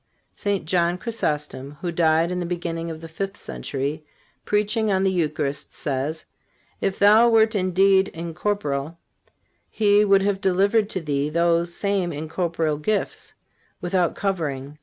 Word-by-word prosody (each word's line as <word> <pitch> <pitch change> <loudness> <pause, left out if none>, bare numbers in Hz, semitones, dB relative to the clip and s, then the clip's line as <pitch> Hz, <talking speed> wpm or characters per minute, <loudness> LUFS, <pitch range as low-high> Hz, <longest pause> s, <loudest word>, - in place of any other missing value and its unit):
St. 200 -4 -2
John 175 +1 +1
Chrysostom, 150 - -3
who 175 - -2
died 165 0 +2
in 180 - -2
the 175 - -2
beginning 170 -1 -3
of 160 -1 -7
the 165 - -8
fifth 195 +5 -5
century, 140 +3 -4 0.4
preaching 210 +1 +1
on 190 0 +2
the 190 - +3
Eucharist, 150 -5 -2
says: 145 +3 -3 0.6
"If 195 - -1
thou 215 +4 +6
wert 220 -1 +4
indeed 190 0 +3
incorporeal, 165 -3 -3 0.7
He 210 -1 +3
would 195 -1 +4
have 195 -1 0
delivered 200 +3 +2
to 185 - -3
thee 145 -2 -1
those 170 +1 +1
same 200 -4 0
incorporeal 160 0 -2
gifts 205 +6 -2 0.4
without 175 -1 0
covering. 150 -7 -3
175 Hz, 140 wpm, -23 LUFS, 155-195 Hz, 0.7 s, thou